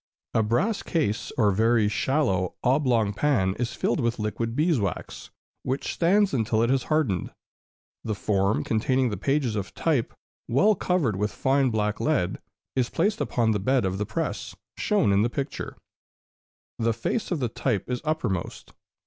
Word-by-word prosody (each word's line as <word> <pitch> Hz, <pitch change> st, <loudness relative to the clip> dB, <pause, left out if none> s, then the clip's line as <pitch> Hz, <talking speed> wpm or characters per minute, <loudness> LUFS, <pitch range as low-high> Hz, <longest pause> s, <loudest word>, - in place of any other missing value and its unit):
A 115 Hz, -, +3 dB
brass 185 Hz, -, +1 dB
case, 135 Hz, -, -1 dB
or 105 Hz, -4 st, +4 dB
very 110 Hz, +2 st, +3 dB
shallow, 105 Hz, -, 0 dB
oblong 125 Hz, -6 st, +2 dB
pan 105 Hz, -8 st, +1 dB
is 125 Hz, -1 st, -2 dB
filled -, -, 0 dB
with 115 Hz, -1 st, 0 dB
liquid 115 Hz, +1 st, -2 dB
beeswax, 145 Hz, -, -1 dB, 0.3 s
which 130 Hz, +2 st, -2 dB
stands 195 Hz, +3 st, +3 dB
until 110 Hz, -2 st, +1 dB
it 120 Hz, -, +2 dB
has 135 Hz, -1 st, +1 dB
hardened. 145 Hz, -, 0 dB, 0.7 s
The 110 Hz, -2 st, -2 dB
form 100 Hz, 0 st, +1 dB
containing 125 Hz, +3 st, +1 dB
the -, -, -2 dB
pages 135 Hz, +1 st, 0 dB
of 100 Hz, -3 st, -4 dB
type, 150 Hz, -8 st, 0 dB, 0.4 s
well 200 Hz, -, +4 dB
covered 175 Hz, -, 0 dB
with 105 Hz, +2 st, 0 dB
fine 135 Hz, 0 st, +2 dB
black 105 Hz, -2 st, -1 dB
lead, 150 Hz, -13 st, 0 dB, 0.4 s
is 125 Hz, -2 st, +1 dB
placed 205 Hz, +6 st, 0 dB
upon 115 Hz, -2 st, +1 dB
the 105 Hz, -, 0 dB
bed 130 Hz, +3 st, +2 dB
of 95 Hz, +1 st, -2 dB
the 105 Hz, -, -2 dB
press, -, -, -3 dB, 0.2 s
shown 205 Hz, -, +2 dB
in 100 Hz, -, +4 dB
the 115 Hz, -, +2 dB
picture; 135 Hz, +3 st, -5 dB, 1.0 s
the 115 Hz, 0 st, +2 dB
face 120 Hz, -, -2 dB
of 175 Hz, -, -1 dB
the 125 Hz, -, 0 dB
type 115 Hz, -3 st, -2 dB
is 125 Hz, -1 st, -3 dB
uppermost. 125 Hz, -, -3 dB
120 Hz, 160 wpm, -26 LUFS, 105-145 Hz, 1.0 s, or